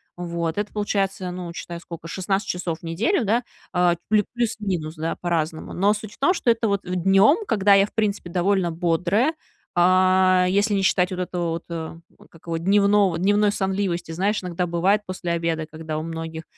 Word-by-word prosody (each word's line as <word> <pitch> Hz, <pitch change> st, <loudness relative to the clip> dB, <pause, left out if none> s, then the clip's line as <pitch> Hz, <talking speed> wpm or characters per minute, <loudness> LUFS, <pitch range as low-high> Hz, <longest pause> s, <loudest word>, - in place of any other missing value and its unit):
Вот. 170 Hz, -1 st, -3 dB
Это 205 Hz, 0 st, -2 dB
получается, 195 Hz, -3 st, -1 dB
ну, 180 Hz, -1 st, -6 dB
считай, 170 Hz, 0 st, -7 dB
сколько, 165 Hz, -1 st, -9 dB
16 195 Hz, +3 st, -2 dB
часов 175 Hz, -2 st, -3 dB
в -, -, -32 dB
неделю, 220 Hz, -, 0 dB
да, 230 Hz, +4 st, +1 dB, 0.3 s
э, 180 Hz, -1 st, +3 dB
плюс 210 Hz, -1 st, +3 dB
плюс-минус, 195 Hz, -9 st, -2 dB
да, 160 Hz, +1 st, -3 dB
по-разному. 165 Hz, -2 st, -2 dB
Но 200 Hz, +3 st, +3 dB
суть 215 Hz, 0 st, -7 dB
в -, -, -18 dB
том, 360 Hz, +7 st, +3 dB
что 255 Hz, -, -1 dB
это 230 Hz, -1 st, +2 dB
вот 200 Hz, 0 st, 0 dB
днем, 195 Hz, -, +3 dB
когда 205 Hz, -, +3 dB
я, 195 Hz, 0 st, +6 dB
в -, -, -15 dB
принципе, 205 Hz, -5 st, -1 dB
довольно 180 Hz, 0 st, +1 dB
бодрая, 180 Hz, -, +1 dB, 0.4 s
э, 185 Hz, +1 st, +4 dB
если 205 Hz, +2 st, +2 dB
не 195 Hz, -, +1 dB
считать 185 Hz, -1 st, +2 dB
вот 185 Hz, -, -4 dB
этого 175 Hz, -2 st, -2 dB
вот, 165 Hz, -, -4 dB
э, 165 Hz, -1 st, -5 dB, 0.3 s
как 165 Hz, -, -18 dB
его? 165 Hz, -1 st, -2 dB
Дневного 200 Hz, 0 st, +3 dB
дневной 205 Hz, +3 st, +3 dB
сонливости, 190 Hz, -4 st, -2 dB
знаешь, 195 Hz, +4 st, -1 dB
иногда 180 Hz, 0 st, -2 dB
бывает 185 Hz, +5 st, +2 dB
после 185 Hz, -2 st, -4 dB
обеда, 165 Hz, -2 st, -1 dB
когда 155 Hz, 0 st, -6 dB
у 155 Hz, -, -3 dB
многих 165 Hz, 0 st, -6 dB
185 Hz, 185 wpm, -23 LUFS, 170-205 Hz, 0.4 s, я